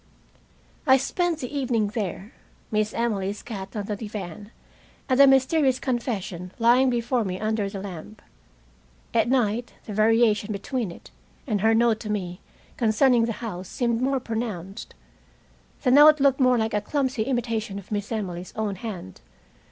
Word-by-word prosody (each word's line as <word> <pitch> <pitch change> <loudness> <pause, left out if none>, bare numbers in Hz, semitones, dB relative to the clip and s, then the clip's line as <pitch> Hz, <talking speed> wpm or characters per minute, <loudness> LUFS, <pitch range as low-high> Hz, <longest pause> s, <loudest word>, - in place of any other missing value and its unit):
I 265 0 +7
spent 345 +5 -1
the 255 +3 -5
evening 240 -6 0
there, 205 -1 -4 0.4
Miss 215 0 +1
Emily's 205 -4 -2
cat 200 -4 -7
on 205 -2 -3
the 210 - -3
divan, 205 -2 -7 0.6
and 260 0 +1
the 280 - +9
mysterious 270 0 +4
confession 205 -8 -3
lying 245 +3 +4
before 240 0 0
me 185 -2 -4
under 215 -2 -1
the 195 -1 -6
lamp. 200 +2 -8 0.9
At 230 0 +2
night 240 -2 0
the 210 - -6
variation 215 0 +3
between 230 +2 -3
it - - -14 0.3
and 210 -6 -1
her 225 +1 +4
note 230 -1 +3
to 215 - -7
me 185 -3 -3 0.4
concerning 235 +1 +3
the 230 - -2
house 185 -4 -6
seemed 235 -2 -1
more 270 +1 +1
pronounced. 220 -6 -5 0.9
The 250 - +3
note 300 +3 +8
looked 275 -1 +3
more 255 -2 +4
like 220 -1 -1
a 210 - +1
clumsy 260 0 -1
imitation 230 -4 -2
of 200 +1 -10
Miss 205 +1 -3
Emily's 185 -5 -4
own 210 -3 -2
hand. 195 - -7
225 Hz, 155 wpm, -25 LUFS, 205-250 Hz, 0.9 s, the